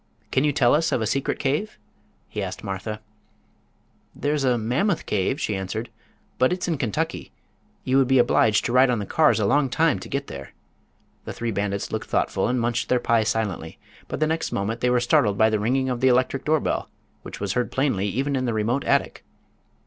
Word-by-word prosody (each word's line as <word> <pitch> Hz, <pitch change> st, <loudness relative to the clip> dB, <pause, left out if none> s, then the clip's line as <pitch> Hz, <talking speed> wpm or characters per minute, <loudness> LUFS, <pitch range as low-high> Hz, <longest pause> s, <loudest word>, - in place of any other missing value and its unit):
Can 130 Hz, -, +2 dB
you 150 Hz, -, +3 dB
tell 130 Hz, -4 st, +3 dB
us 160 Hz, +3 st, +2 dB
of -, -, +1 dB
a 110 Hz, -, -1 dB
secret 135 Hz, +5 st, -1 dB
cave?" 145 Hz, +10 st, -2 dB, 0.5 s
he -, -, -5 dB
asked -, -, -5 dB
Martha. 105 Hz, +3 st, -5 dB, 1.1 s
"There's 145 Hz, 0 st, -1 dB
a 125 Hz, -2 st, +2 dB
Mammoth 135 Hz, -, 0 dB
cave," 105 Hz, +8 st, -1 dB
she 105 Hz, -, -1 dB
answered, 110 Hz, +5 st, -4 dB, 0.5 s
"but 130 Hz, -, +4 dB
it's 180 Hz, 0 st, -2 dB
in 165 Hz, -5 st, -1 dB
Kentucky. 115 Hz, -8 st, -2 dB, 0.5 s
You 130 Hz, +1 st, +2 dB
would 135 Hz, -, +3 dB
be 135 Hz, 0 st, +4 dB
obliged 115 Hz, -3 st, +3 dB
to -, -, -1 dB
ride 130 Hz, +1 st, +5 dB
on 125 Hz, -, +1 dB
the 105 Hz, -, -3 dB
cars 150 Hz, -3 st, +3 dB
a 105 Hz, -, +1 dB
long 140 Hz, +5 st, +2 dB
time 160 Hz, +4 st, +2 dB
to -, -, -10 dB
get 140 Hz, +1 st, -2 dB
there." 70 Hz, -, -9 dB, 0.7 s
The -, -, -5 dB
three 115 Hz, -1 st, -3 dB
bandits 100 Hz, -1 st, -2 dB
looked -, -, -4 dB
thoughtful -, -, 0 dB
and 125 Hz, +1 st, 0 dB
munched 120 Hz, +1 st, -1 dB
their 125 Hz, -, +3 dB
pie 115 Hz, -2 st, +2 dB
silently, 105 Hz, -7 st, -2 dB, 0.3 s
but -, -, -5 dB
the 155 Hz, -, +3 dB
next 160 Hz, +1 st, -2 dB
moment 110 Hz, +4 st, -2 dB
they 125 Hz, -, +2 dB
were 125 Hz, 0 st, +3 dB
startled 115 Hz, -4 st, +2 dB
by 110 Hz, +1 st, +4 dB
the 110 Hz, -, +1 dB
ringing 130 Hz, +5 st, 0 dB
of 125 Hz, -2 st, -2 dB
the 130 Hz, -, +4 dB
electric 130 Hz, +1 st, +2 dB
doorbell, 155 Hz, -1 st, 0 dB, 0.3 s
which -, -, -9 dB
was 100 Hz, -1 st, -2 dB
heard 125 Hz, +2 st, -1 dB
plainly 130 Hz, -8 st, 0 dB
even 135 Hz, +7 st, -1 dB
in 130 Hz, -1 st, -1 dB
the 120 Hz, -2 st, -1 dB
remote 115 Hz, +6 st, 0 dB
attic. -, -, 0 dB
125 Hz, 210 wpm, -24 LUFS, 110-135 Hz, 1.1 s, ride